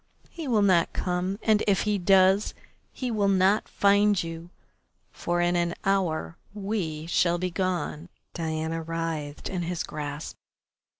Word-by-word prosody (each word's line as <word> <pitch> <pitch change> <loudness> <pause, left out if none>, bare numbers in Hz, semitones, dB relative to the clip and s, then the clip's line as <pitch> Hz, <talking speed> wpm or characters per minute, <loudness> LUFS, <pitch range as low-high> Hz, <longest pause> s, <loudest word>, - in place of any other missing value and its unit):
He 330 -4 -6
will 220 -5 +3
not 180 -4 +3
come, 180 +2 -1
and 215 -1 +3
if 200 -2 +3
he 210 -1 0
does, 190 +2 +4 0.4
he 255 -2 -4
will 205 -3 +1
not 195 +2 +3
find 200 -1 +3
you, 165 +1 -7 0.6
for 175 0 -1
in 175 0 +2
an 170 0 0
hour 180 -4 0 0.2
we 195 -7 -3
shall 170 +1 +2
be 180 +1 -2
gone." 180 -3 -2 0.2
Diana 160 0 -2
writhed 165 -3 -4
in 185 -2 -3
his 175 0 -2
grasp. 150 0 -6
180 Hz, 140 wpm, -26 LUFS, 165-200 Hz, 0.6 s, does